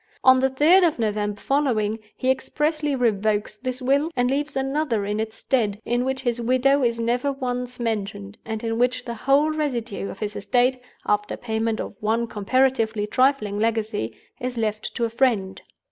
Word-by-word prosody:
On 260 0 +7
the 265 +1 +2
third 310 +8 +5
of 330 -3 +2
November 210 -2 -1
following, 230 -7 0 0.2
he 260 - +2
expressly 295 +2 -1
revokes 215 -3 0
this 255 +3 -5
will, 280 +5 +2
and 245 +1 +1
leaves 290 +2 -1
another 270 -5 0
in 210 +1 -2
its 220 0 -4
stead, 215 -6 0
in 240 +1 +1
which 265 0 -2
his 240 -2 -1
widow 255 +4 +3
is 235 -1 +1
never 245 +4 0
once 250 -2 -4
mentioned, 200 - -3
and 220 0 -5
in 225 0 -1
which 250 0 +1
the 235 - -4
whole 275 +6 +2
residue 240 -10 -2
of - - -8
his 210 -1 -4
estate, 250 +4 +1 0.2
after 210 0 0
payment 225 -1 -1
of 200 - -6
one 225 +2 +1
comparatively 225 0 +1
trifling 235 -3 +1
legacy, 220 - -1 0.2
is 250 0 -4
left 215 -1 -2
to 235 - +1
a - - -2
friend. 225 -6 +1
240 Hz, 175 wpm, -24 LUFS, 215-265 Hz, 0.2 s, On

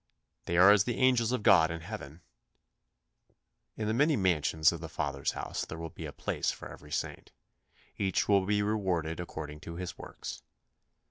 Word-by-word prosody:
"They 85 - -1
are 95 +3 +9
as 100 -1 +5
the 120 - -2
angels 125 -3 +3
of 125 -4 -1
God 90 -6 +6
in 85 0 -5
heaven." 85 -4 -8 1.6
In 110 - -2
the 110 - +1
many 145 +6 +3
mansions 80 - +3
of 85 -2 -6
the 80 - -6
Father's 70 -3 -2
house - - -4
there 80 - -7
will 80 -1 -6
be - - -7
a - - -7
place - - -2
for - - -5
every 75 0 -12
saint. - - -4 0.7
Each 95 -2 +1
will 100 -2 +4
be 105 0 +2
rewarded 90 -7 -1
according 75 -3 -6
to 85 +2 -8
his 90 0 -6
works. - - -8
90 Hz, 180 wpm, -30 LUFS, 80-105 Hz, 1.6 s, are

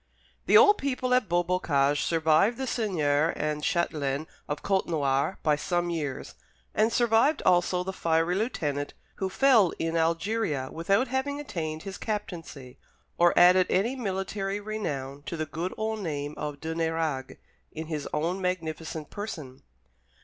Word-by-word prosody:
The - - +7
old 415 -2 +7
people 255 -2 -1
at 250 -6 +2
Beaubocage 165 -5 +1
survived 165 +7 +3
the 265 - -2
seigneur 160 - +1
and 150 0 -2
châtelaine 150 -4 -1 0.2
of 145 - -4
Côtenoir 160 -5 +1
by 150 -1 +3
some 175 +3 -1
years, 145 -5 -4 0.4
and 220 +2 +2
survived 240 +6 +3
also 180 0 +3
the 190 +1 -4
fiery 165 -1 +1
lieutenant, 150 - -2 0.2
who 190 - -2
fell 225 -4 +4
in 165 0 -2
Algeria 165 -3 0
without 195 +10 +1
having 275 +3 -1
attained 160 - -4
his 195 -1 -7
captaincy, 165 - -6 0.4
or 175 0 +4
added 180 +1 +6
any 220 +8 +1
military 195 -3 -3
renown 145 -11 -4
to 170 - -4
the 155 - -2
good 165 +5 -4
old 220 0 -2
name 145 -5 -3
of 150 -1 -5
de 160 +2 -4
Nérague 160 -5 -2 0.3
in 160 +1 -6
his 155 -3 -4
own 170 +5 -1
magnificent 160 -4 -3
person. 155 -11 -7
170 Hz, 140 wpm, -27 LUFS, 150-205 Hz, 0.4 s, The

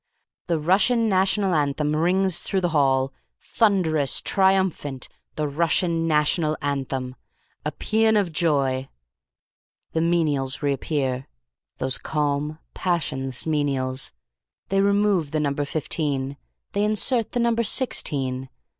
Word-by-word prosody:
"The 170 -2 +1
Russian 205 +9 +3
National 195 0 +2
Anthem 150 0 0
rings 180 +3 +2
through 190 - -1
the 175 - +1
hall. 135 -2 +2 0.3
Thunderous! 170 - +2
Triumphant! 190 -9 +1 0.3
The 155 -1 -1
Russian 165 +2 +1
National 155 0 +2
Anthem. 135 -2 -3 0.5
A - - -2
paean 220 0 +2
of 195 -5 0
joy. 140 -5 +1 1.0
"The 160 - 0
menials 150 -6 +1
reappear. 135 -2 -1 0.5
Those 130 0 -1
calm, 150 0 -1 0.2
passionless 135 -7 -1
menials. 135 -4 -1 0.6
They 195 0 +2
remove 200 -5 +2
the 155 - -1
number 145 -1 -1
fifteen. 140 -2 -2 0.4
They 205 - 0
insert 215 +2 +1
the 245 - 0
number 235 -1 +2
sixteen. 135 - 0
155 Hz, 110 wpm, -24 LUFS, 140-190 Hz, 1.0 s, Russian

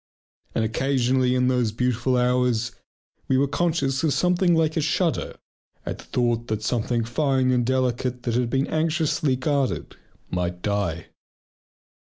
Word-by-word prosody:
And 110 - +1
occasionally 130 +1 +1
in 125 0 +2
those 125 -3 +1
beautiful 125 +2 0
hours 125 -2 +1 0.6
we 130 - +2
were 140 +1 +3
conscious 145 -3 0
of 155 -4 +2
something 180 -1 +3
like 160 -1 +1
a 160 - +1
shudder 165 +2 0 0.5
at - - -4
the - - -10
thought 120 -1 0
that 110 -1 -2
something 115 +1 0
fine 130 +1 +1
and 125 -1 +2
delicate 125 0 -1
that 120 - -1
had 120 0 +1
been 135 +3 +1
anxiously 155 -3 0
guarded 135 0 -1 0.4
might 90 0 -2
die. 100 -6 -2
125 Hz, 145 wpm, -24 LUFS, 120-140 Hz, 0.6 s, were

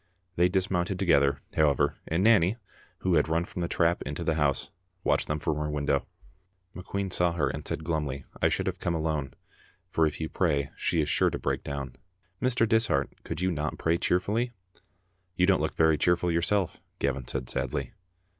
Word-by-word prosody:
They 90 +1 +4
dismounted 95 -1 0
together, 70 -7 +3
however, 75 -4 +3
and 85 +4 +1
Nanny, 105 -2 +5 0.4
who 95 - +1
had 75 -2 +3
run 85 +2 +1
from 90 - -6
the 85 - 0
trap 85 +1 +1
into 70 +1 -4
the 80 - +1
house, 75 -3 0 0.3
watched - - +2
them 75 - 0
from 75 0 -1
her 75 0 -2
window. 70 -2 0 0.7
McQueen 95 +1 -4
saw 90 -1 +2
her 80 -4 +1
and - - -6
said 80 - -3
glumly, 75 -5 -2 0.2
I - - +4
should - - -1
have - - -2
come 85 - -1
alone, 80 -4 -2 0.5
for 80 -1 +2
if 75 - -5
you 80 - -2
pray 70 -6 0
she 85 - +1
is 75 - -1
sure - - +3
to - - -3
break - - -2
down. 70 -2 -5 0.4
Mr. 125 -2 +2
Dishart, 110 - +2
could 80 - -5
you 95 0 +2
not 75 -2 -2
pray 85 +1 +1
cheerfully?" 105 +7 0 0.8
"You 90 - +4
don't 95 -4 +3
look 80 - -2
very 80 -2 +4
cheerful 90 0 +2
yourself," 85 +3 0 0.2
Gavin 70 -2 -1
said 65 -2 -3
sadly. 65 +1 -3
80 Hz, 185 wpm, -28 LUFS, 75-90 Hz, 0.8 s, Nanny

